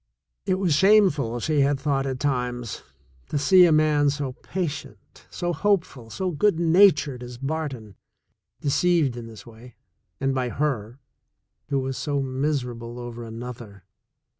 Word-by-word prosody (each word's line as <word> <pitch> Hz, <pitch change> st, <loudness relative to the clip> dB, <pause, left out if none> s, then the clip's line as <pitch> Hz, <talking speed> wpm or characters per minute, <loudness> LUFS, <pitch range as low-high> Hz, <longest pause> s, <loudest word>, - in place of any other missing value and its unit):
It 185 Hz, -, +2 dB
was 185 Hz, -4 st, +1 dB
shameful, 155 Hz, -, +4 dB
she 155 Hz, +4 st, 0 dB
had 140 Hz, 0 st, +2 dB
thought 135 Hz, -2 st, 0 dB
at 130 Hz, -1 st, -3 dB
times, 125 Hz, -5 st, -2 dB, 0.5 s
to -, -, -1 dB
see 180 Hz, +5 st, +6 dB
a -, -, +2 dB
man 155 Hz, -2 st, +3 dB
so 140 Hz, -2 st, -2 dB
patient, 145 Hz, -, -6 dB
so 175 Hz, 0 st, -3 dB
hopeful, 170 Hz, -, -1 dB
so 185 Hz, -, -3 dB
good 170 Hz, +2 st, +1 dB
natured 165 Hz, -6 st, +4 dB
as 125 Hz, 0 st, -8 dB
Barton, 135 Hz, -6 st, -4 dB, 0.7 s
deceived 155 Hz, -2 st, +2 dB
in 120 Hz, -1 st, -7 dB
this 110 Hz, -3 st, -12 dB
way, 115 Hz, +1 st, -14 dB, 0.4 s
and 135 Hz, 0 st, 0 dB
by 130 Hz, -2 st, -1 dB
her, 120 Hz, -5 st, -2 dB, 0.7 s
who 140 Hz, -, +1 dB
was 130 Hz, -1 st, -4 dB
so 140 Hz, +2 st, -1 dB
miserable 130 Hz, -3 st, -3 dB
over 120 Hz, -1 st, -7 dB
another. 115 Hz, -3 st, -9 dB
135 Hz, 140 wpm, -24 LUFS, 120-155 Hz, 0.7 s, see